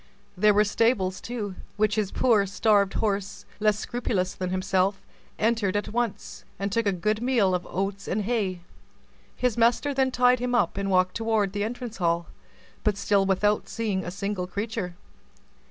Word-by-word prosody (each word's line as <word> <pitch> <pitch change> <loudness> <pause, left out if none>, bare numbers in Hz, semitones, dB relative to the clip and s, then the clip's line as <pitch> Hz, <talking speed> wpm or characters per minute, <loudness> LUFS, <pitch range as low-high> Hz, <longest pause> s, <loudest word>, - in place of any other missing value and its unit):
There 210 +2 +4
were 210 - +5
stables, 205 -3 +1
too, 220 -5 -4 0.2
which 215 0 +2
his 210 -3 0
poor, 215 -6 +3
starved 200 0 +2
horse, 200 -2 -2
less 210 -1 +3
scrupulous 210 -5 -2
than 185 -1 -4
himself, 190 +1 +1 0.4
entered 215 -3 +1
at 205 - -4
once, 230 -4 -3
and 200 0 -2
took 230 +1 +1
a - - +4
good 210 +4 -1
meal 235 -7 +2
of 180 -1 -2
oats 195 +1 -3
and 210 +3 -1
hay. 195 -5 -1 0.7
His 250 -3 0
master 240 +5 +3
then 265 -1 +2
tied 250 0 +3
him 245 0 -1
up, 240 - +2
and 195 0 -2
walked 185 -1 +3
toward 220 -3 0
the 205 0 -1
entrance 235 0 -5
hall, 170 -2 +1 0.6
but 210 -2 +1
still 200 -1 +2
without 205 +2 +1
seeing 210 -5 -2
a 175 - -4
single 195 0 -3
creature. 200 -1 -4
205 Hz, 170 wpm, -26 LUFS, 190-225 Hz, 0.7 s, were